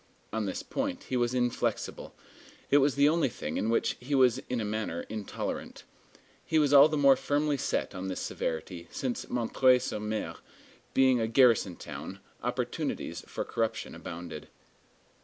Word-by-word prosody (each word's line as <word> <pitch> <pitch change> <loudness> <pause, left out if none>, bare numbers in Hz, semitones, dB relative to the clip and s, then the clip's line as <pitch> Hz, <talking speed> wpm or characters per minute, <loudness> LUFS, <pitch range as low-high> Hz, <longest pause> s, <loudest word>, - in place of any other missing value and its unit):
On 110 -2 -1
this 95 - -4
point 270 -1 -3
he 130 - -1
was 120 0 +1
inflexible. 120 -1 -1 0.6
It 145 - +7
was 140 0 +3
the 140 +1 +5
only 160 -2 +3
thing 80 -7 -5
in 110 - 0
which 115 - +1
he 140 +4 -2
was 130 -2 +4
in 125 - -1
a 110 - -2
manner 105 -5 -2
intolerant. 105 -2 -5 0.6
He 160 - 0
was 145 -2 +3
all 140 +1 +9
the 155 -1 -1
more 140 -2 +6
firmly 145 +2 0
set 135 - -1
on 95 0 -5
this 95 - -3
severity, 85 +2 -4
since 125 -3 -3
M. 120 -2 -2 0.3
sur 125 - -3
M., 105 +1 -3 0.6
being 130 -2 +5
a 110 - +1
garrison 115 -6 +4
town, - - -8 0.2
opportunities - - -3
for - - -4
corruption 115 -1 -2
abounded. 85 +1 -7
120 Hz, 160 wpm, -29 LUFS, 105-140 Hz, 0.6 s, all